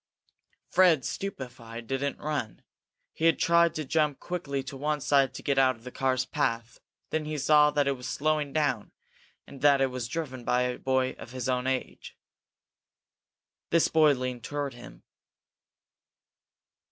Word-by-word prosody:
Fred, 170 -8 +4
stupefied, 125 -10 -6
didn't 135 +3 -2
run. 145 -7 -4 0.5
He 160 - -2
had 165 - +5
to 170 -2 +3
jump 150 -1 +1
quickly 140 -6 -4
to 135 +1 -8
one 150 +2 -1
side 140 -1 +3
to - - -8
get 140 -1 +1
out 130 -1 +4
of 115 - -21
the 125 - -8
car's 130 -1 0
path. 115 -1 -2 0.3
Then 155 -1 -1
he 155 0 -3
saw 150 +1 +5
that 145 -1 +1
it - - +3
was 125 -2 -5
slowing 150 -1 0
down, 140 -8 -1 0.5
and 135 - -12
that 140 -1 +5
it 135 -1 +1
was 125 -1 -4
driven 130 -4 -5
by 125 +1 +2
a 125 0 -2
boy 130 -1 +1
of 120 - -10
his 130 -1 -4
own 125 0 0
age. 130 -1 -4 1.5
This 165 -1 +3
boy 155 -2 +5
leaned 125 -2 -4
toward 145 -2 -3
him. 120 0 -13
135 Hz, 155 wpm, -28 LUFS, 130-150 Hz, 1.5 s, had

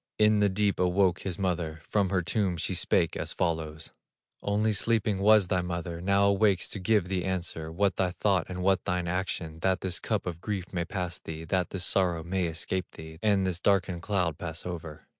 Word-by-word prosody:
In 105 -1 +4
the 105 -1 +4
deep 100 +1 0
awoke 90 0 +3
his 95 -3 -4
mother, 85 -5 -2
From 100 -3 +1
her 95 -2 +1
tomb 95 -1 0
she 90 +3 -1
spake 85 -1 +1
as - - -3
follows: 80 -2 -2 0.5
"Only 105 +2 +1
sleeping 105 -1 +1
was 105 -1 +5
thy 90 - +2
mother, 85 -1 -4
Now 100 +2 +3
awakes 100 -2 +3
to 105 - -3
give 95 0 +2
thee 90 -2 -1
answer, 85 -4 -3
What 100 +2 +1
thy 95 -1 +2
thought 95 -1 +1
and 90 0 -4
what 95 -1 +3
thine 90 -2 -1
action, 85 -3 -3
That 95 +2 +1
this 90 -2 -1
cup 110 -3 -2
of 85 -2 -5
grief 95 -3 -4
may 85 -2 -1
pass 90 -1 -4
thee, 80 0 -7
That 90 +1 0
this 95 -2 -3
sorrow 90 -4 +1
may 90 +1 -1
escape 85 +2 -2
thee, 80 0 -10
And 100 -3 +3
this 90 -2 -1
darkened 90 -3 +1
cloud 90 -5 0
pass 85 -1 -5
over. 85 -4 -7
90 Hz, 200 wpm, -28 LUFS, 85-100 Hz, 0.5 s, was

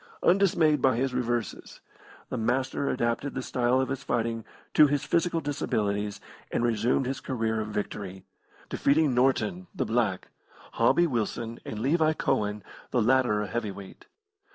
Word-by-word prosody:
Undismayed 170 -6 +4
by 130 -2 +4
his 130 +2 0
reverses, 120 -2 -3 0.5
the - - -3
Master 130 +4 0
adapted 120 +3 -1
the 130 - -3
style 125 +1 +1
of 130 - 0
his 135 0 -3
fighting 115 -1 -1 0.3
to 150 - +7
his 145 0 0
physical 170 -1 +1
disabilities 105 -8 -1 0.3
and - - 0
resumed 120 +3 +1
his 130 +1 -3
career 110 -4 -1
of 105 - -4
victory 100 -2 -5 0.4
defeating 145 -1 +2
Norton 135 +9 +1
(the - - -1
black), 110 -5 0 0.4
Hobby 175 - +3
Wilson, 115 -4 -2
and 110 - -5
Levi 155 +7 +2
Cohen, 105 -9 -1 0.3
the 125 - +1
latter 120 -3 +3
a - - -4
heavy 110 +2 -2
weight. 100 -1 -11
125 Hz, 150 wpm, -27 LUFS, 110-140 Hz, 0.5 s, to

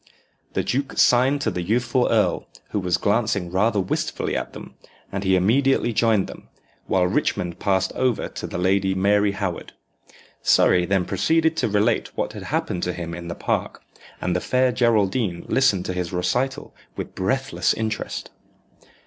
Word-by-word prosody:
The - - 0
duke 135 +2 -2
signed 130 +4 +4
to 110 - 0
the 90 - -3
youthful 120 +6 +1
earl, - - +1 0.2
who 105 - 0
was 90 -2 +1
glancing 100 -2 0
rather 105 +3 +2
wistfully 95 - -2
at - - -3
them, - - -10 0.4
and 100 0 -3
he 95 -1 +3
immediately 120 +6 +2
joined 110 -3 +2
them, - - -12 0.4
while 90 -1 +2
Richmond 90 -1 -1
passed 95 -2 +1
over 130 -3 0
to - - -7
the - - -5
Lady 95 +1 +1
Mary 100 +1 +2
Howard. 100 -4 -4 0.7
Surrey 90 -1 +4
then 95 -2 +1
proceeded 160 - +1
to 160 - +1
relate 105 +1 0
what - - -2
had - - -8
happened 90 - -2
to 90 - -1
him 85 -1 -6
in 85 0 -7
the 85 - -5
park, - - -2 0.4
and 90 0 -1
the 90 - 0
fair 130 0 +2
Geraldine 110 -5 +1
listened 100 -9 +2
to 95 - -2
his 90 -1 -3
recital 125 +9 -1 0.2
with - - -6
breathless 135 +9 0
interest. 110 -1 -4
100 Hz, 165 wpm, -23 LUFS, 90-120 Hz, 0.7 s, signed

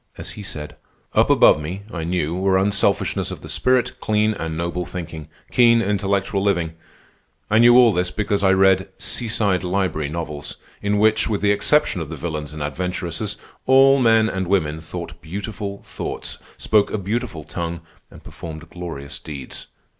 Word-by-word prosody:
As - - -6
he 105 - -8
said: 75 -6 -7 0.4
"Up - - +4
above 75 - +6
me, 90 +6 -5
I 85 -2 -3
knew, 85 -2 -1
were 95 +1 +2
unselfishnesses 100 +1 +1
of - - -7
the - - -9
spirit, 125 -1 +1
clean 110 0 +2
and 80 -5 -4
noble 85 +1 -2
thinking, 80 -4 -7 0.2
keen 115 -1 +5
intellectual 100 -1 0
living. 85 -5 +1 0.8
I 110 - +5
knew 120 +1 +7
all 120 -3 +7
this 90 0 0
because 100 0 -1
I 95 - +5
read 95 0 +4
'Seaside 105 -6 0
Library' 90 -5 -1
novels, 75 -2 -5 0.3
in 105 0 +1
which, 110 +1 +3
with 105 -2 -1
the 100 0 +3
exception 105 - +2
of 80 - -5
the 80 - -5
villains 75 -1 -4
and 75 -1 -5
adventuresses, 90 +6 -3 0.3
all 135 +1 +6
men 115 -3 +4
and 95 -3 -2
women 80 -5 0
thought 85 0 -8
beautiful 100 +3 -6
thoughts, - - -5 0.2
spoke 105 -2 +2
a - - -2
beautiful 100 -4 -3
tongue, 85 +1 -4 0.3
and - - -15
performed 80 -2 -9
glorious 80 -6 -7
deeds. 70 -4 -8
95 Hz, 165 wpm, -21 LUFS, 85-105 Hz, 0.8 s, knew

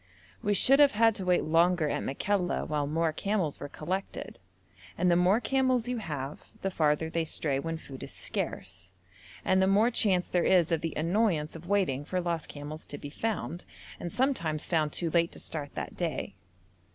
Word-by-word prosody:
We 205 -3 +1
should 270 +8 +5
have 290 -1 +6
had 225 +1 +4
to 195 -3 -4
wait 180 -1 +3
longer 165 +1 +3
at - - -1
Makalla 180 +6 -1
while 150 -3 -1
more 160 +1 0
camels 190 -4 -1
were 145 - -6
collected, 185 +7 -4 0.6
and 180 0 +3
the - - +5
more 180 +5 +4
camels 255 -2 +1
you 250 0 -1
have 145 -8 -5 0.2
the 195 - 0
farther 155 -2 +1
they 165 +1 -1
stray 145 -3 -1
when 165 +2 -3
food 135 -4 -10
is - - -6
scarce, 90 - -3 0.6
and 190 0 +3
the 190 - +4
more 210 +5 +4
chance 190 -6 +2
there 175 - +1
is 180 -3 +4
of 165 -2 +1
the 165 -2 -3
annoyance 165 -2 +1
of 165 +1 -10
waiting 180 -9 +1
for 185 +5 -2
lost 170 -3 -2
camels 150 +2 -7
to 145 - -5
be 145 0 -8
found, 195 -3 -3 0.3
and 175 - -5
sometimes 170 - 0
found 155 -3 +1
too 165 +1 0
late 170 0 +2
to - - -8
start 145 -3 -5
that - - -5
day. 160 - -3
170 Hz, 190 wpm, -29 LUFS, 155-195 Hz, 0.6 s, have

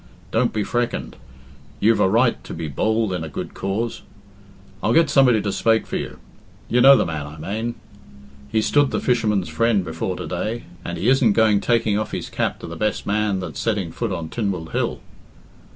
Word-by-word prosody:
'Don't 120 +2 +2
be 105 - -1
freckened; 120 +3 -2 0.6
you've 110 +2 +3
a 95 - +4
right 115 +4 +2
to - - -7
be 80 - -4
bould 110 - 0
in 90 -3 -3
a 80 - -5
good - - -6
cause. 105 +4 -3 0.8
I'll 115 - +1
get 165 -2 +4
somebody 125 -6 +4
to 100 - -1
spake 115 +2 +2
for - - -3
you. - - -6 0.5
You 125 +1 +2
know 135 +2 +9
the - - +2
man 75 -3 -4
I 75 +2 -10
mane. 110 +9 -3 0.8
He's 110 - +1
stood 145 -2 +3
the - - -1
fisherman's 110 -7 +1
friend 115 -5 +1
before 80 +3 -3
to 90 - -6
day, 105 +8 -3 0.2
and 85 - -4
he 90 +7 -1
isn't 130 -4 +4
going 110 -2 +3
taking 110 -3 +2
off 110 - -4
his - - -4
cap - - -1
to - - -7
the - - -7
best 105 -1 -1
man 105 -2 0
that's 90 - -6
setting 100 -7 -1
foot 115 -3 -3
on 85 -4 -4
Tynwald 95 -7 -3
Hill." - - -1
105 Hz, 200 wpm, -22 LUFS, 95-115 Hz, 0.8 s, know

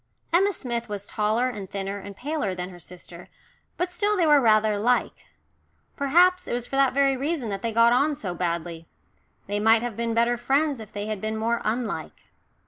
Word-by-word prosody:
Emma 390 +4 +4
Smith 240 - -4
was 205 -1 -5
taller 215 +4 0
and 205 -6 -6
thinner 195 0 -4
and 200 0 -10
paler 270 -7 -3
than 180 +1 -5
her 175 - -12
sister, 175 0 -12 0.5
but 360 +1 -1
still 410 +4 0
they 345 - +3
were 295 -2 +5
rather 215 -2 +3
like. 245 +4 0 0.7
Perhaps 355 +6 +3
it - - -3
was 240 0 -2
for 270 - -6
that 270 -1 +3
very 275 -1 +3
reason 275 -2 -2
that 195 -1 -4
they 230 - -2
got 230 +1 +5
on 285 +4 +2
so 190 -10 -5
badly 170 -2 -4 0.6
they 205 +1 -2
might 225 +2 +4
have 240 -3 -4
been 230 0 -2
better 235 +1 +2
friends 275 +3 +1
if 220 -2 -10
they 205 0 -5
had 215 -2 -4
been 220 0 -2
more 230 +2 -1
unlike. 230 +2 -3
230 Hz, 200 wpm, -25 LUFS, 205-275 Hz, 0.7 s, were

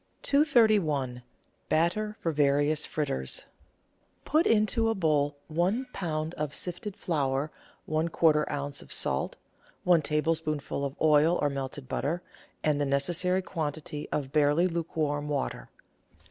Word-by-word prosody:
231— 210 - +3 0.5
BATTER 185 +7 +1
FOR 165 - 0
VARIOUS 145 +1 +2
FRITTERS 65 - -2 0.8
Put 315 +3 +3
into 225 +1 +2
a 225 - +1
bowl 150 -5 +1
one 180 +11 0
lb. 160 -2 -3
of 150 -3 -3
sifted 180 +3 -4
flour, 145 -2 -1 0.3
one 160 +2 0
quarter 155 -2 +3
oz. 145 -1 -3
of - - -14
salt, - - +1 0.5
one 175 -2 +5
tablespoonful 150 -1 -1
of 140 0 -3
oil 155 +2 +4
or 145 -1 +1
melted 135 0 -5
butter, 170 +8 -2 0.4
and 150 -1 +2
the - - +2
necessary 175 +7 +2
quantity 150 -3 -4
of 135 -3 -2
barely 150 +3 +3
lukewarm 155 -4 -2
water. 140 -2 -3
155 Hz, 125 wpm, -28 LUFS, 145-175 Hz, 0.8 s, one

